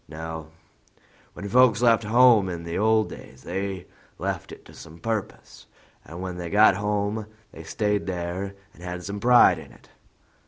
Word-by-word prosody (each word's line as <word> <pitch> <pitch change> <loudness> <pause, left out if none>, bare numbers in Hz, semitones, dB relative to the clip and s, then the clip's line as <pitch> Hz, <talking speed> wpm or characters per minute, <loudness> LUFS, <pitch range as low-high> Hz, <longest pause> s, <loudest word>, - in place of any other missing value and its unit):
No: 80 0 -7 0.9
when 100 - -7
folks 125 +1 +4
left 115 -2 +4
home 115 -3 +5
in 85 -2 -5
the 85 0 -5
old 110 +1 +2
days 65 0 -12
they 95 0 -4 0.3
left - - -4
it - - -12
to - - -15
some 80 - -13
purpose, 110 +3 -5 0.4
and 85 +2 -10
when 90 -1 -5
they 85 -1 -5
got 105 0 +5
home 105 +1 -2 0.2
they 80 - -11
stayed 105 +4 -2
there 90 +2 -4 0.2
and - - -18
had 90 0 -6
some 100 +2 -5
pride 120 +2 +5
in - - -13
it. - - -20
100 Hz, 165 wpm, -25 LUFS, 85-110 Hz, 0.9 s, home